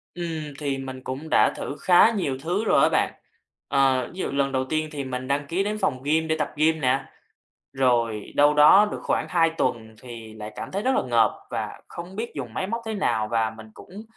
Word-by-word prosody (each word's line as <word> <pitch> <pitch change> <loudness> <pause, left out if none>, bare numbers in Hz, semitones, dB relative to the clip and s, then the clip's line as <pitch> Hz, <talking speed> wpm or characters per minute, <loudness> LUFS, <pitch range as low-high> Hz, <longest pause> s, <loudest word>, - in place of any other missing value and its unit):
Ừm, 160 -4 -5
thì 140 -2 -2
mình 130 -1 -7
cũng 135 +5 -6
đã - - +4
thử 140 - -5
khá 185 +5 +6
nhiều 180 - -2
thứ 180 +6 -1
rồi - - +4
đó - - +5
bạn. - - +1 0.5
Ờ, 135 -2 +2
ví 185 - -10
dụ - - -2
lần 140 0 0
đầu 130 -1 0
tiên 155 +3 -1
thì 145 -3 -4
mình 130 -1 -5
đăng 140 +2 0
ký 180 +6 0
đến 210 +1 -2
phòng 150 -11 -1
gym 160 +3 +1
để 160 - +1
tập 150 - -1
gym 160 +2 +2
nè, 135 +1 +2 0.7
rồi 120 -5 0
đâu 145 +1 +5
đó 155 +8 +7
được - - -5
khoảng - - 0
2 165 -2 +3
tuần 110 -1 -1
thì 115 -3 -10
lại 105 0 -8
cảm - - -6
thấy 200 +2 -2
rất 260 +3 +1
là - - +2
ngợp 115 -3 +3 0.2
và - - -4
không 175 +3 -9
biết 230 +2 -4
dùng 125 -6 -6
máy 190 - -2
móc 230 +4 -3
thế 220 - -3
nào 110 - 0
và 115 -1 +1
mình 110 0 -11
cũng 200 +4 -11
145 Hz, 230 wpm, -24 LUFS, 130-175 Hz, 0.7 s, đó